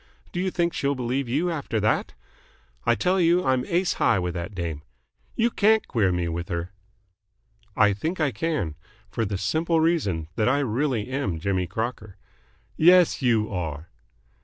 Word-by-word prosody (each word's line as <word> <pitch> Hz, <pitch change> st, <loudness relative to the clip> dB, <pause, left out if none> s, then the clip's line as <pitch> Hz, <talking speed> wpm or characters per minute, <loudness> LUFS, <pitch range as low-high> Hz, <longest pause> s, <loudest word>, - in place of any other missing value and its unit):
Do 175 Hz, -, -4 dB
you 190 Hz, +1 st, 0 dB
think 170 Hz, -1 st, 0 dB
she'll 140 Hz, 0 st, 0 dB
believe 125 Hz, +1 st, -2 dB
you 160 Hz, +8 st, 0 dB
after 140 Hz, -8 st, -2 dB
that? 105 Hz, +1 st, 0 dB, 0.7 s
I 120 Hz, -, +5 dB
tell 180 Hz, -, +1 dB
you 175 Hz, +2 st, +3 dB
I'm 130 Hz, -1 st, +2 dB
ace 175 Hz, +2 st, +1 dB
high 110 Hz, -, +4 dB
with 90 Hz, -1 st, -2 dB
that 90 Hz, +3 st, -5 dB
dame. 85 Hz, -4 st, -4 dB, 0.5 s
You 235 Hz, +1 st, +2 dB
can't 220 Hz, +1 st, +3 dB
queer 105 Hz, -7 st, +1 dB
me 90 Hz, -1 st, -1 dB
with 85 Hz, +1 st, -4 dB
her." 85 Hz, +1 st, -3 dB, 1.0 s
"I 105 Hz, -, +4 dB
think 160 Hz, -, -3 dB
I 150 Hz, -3 st, +2 dB
can. 150 Hz, -, -2 dB, 0.4 s
For 115 Hz, -, -1 dB
the 100 Hz, -1 st, -2 dB
simple 160 Hz, -, 0 dB
reason 140 Hz, -, +1 dB
that 110 Hz, +2 st, +2 dB
I 135 Hz, -, +3 dB
really 125 Hz, -2 st, -1 dB
am 105 Hz, -, -2 dB
Jimmy 95 Hz, 0 st, -1 dB
Crocker." 110 Hz, +1 st, -5 dB, 0.6 s
"Yes, 175 Hz, 0 st, +5 dB
you 115 Hz, -4 st, +1 dB
are." 80 Hz, -3 st, -4 dB
120 Hz, 165 wpm, -25 LUFS, -, 1.0 s, I